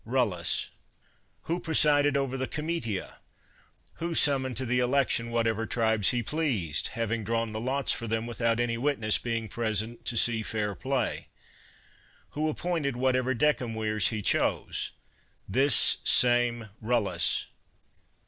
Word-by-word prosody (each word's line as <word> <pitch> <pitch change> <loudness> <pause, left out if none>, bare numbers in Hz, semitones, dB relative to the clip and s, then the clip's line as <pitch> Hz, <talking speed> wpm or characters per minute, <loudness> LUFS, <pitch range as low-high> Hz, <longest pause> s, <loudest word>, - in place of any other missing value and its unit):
Rullus. 110 -8 0 0.7
Who 170 +2 -2
presided 145 -3 +3
over 135 -1 -2
the 130 0 -3
comitia? 150 - -4 0.8
Who 170 0 -3
summoned 130 -5 +2
to 130 - -1
the 125 +1 +1
election 125 -2 +1
whatever 115 -1 -1
tribes 110 -4 +2
he 120 -1 0
pleased, 115 - 0
having 115 -1 -1
drawn 115 +1 -1
the 110 - -3
lots 130 +3 0
for 115 - -2
them 115 +1 -1
with 120 0 -7
out 115 0 +2
any 115 -1 -1
witness 120 -6 +1
being 115 -2 -3
present 115 +1 -2
to 120 - -1
see 115 0 +4
fair 105 -2 -2
play? 130 +2 -2 1.0
Who 155 +1 -1
appointed 155 -4 -2
whatever 130 0 +1
decemvirs 115 -7 +1
he 110 -2 -3
chose? - - 0 0.6
This 130 +5 +3
same 120 -2 +3
Rullus. 100 -9 +1
120 Hz, 130 wpm, -28 LUFS, 110-135 Hz, 1.0 s, see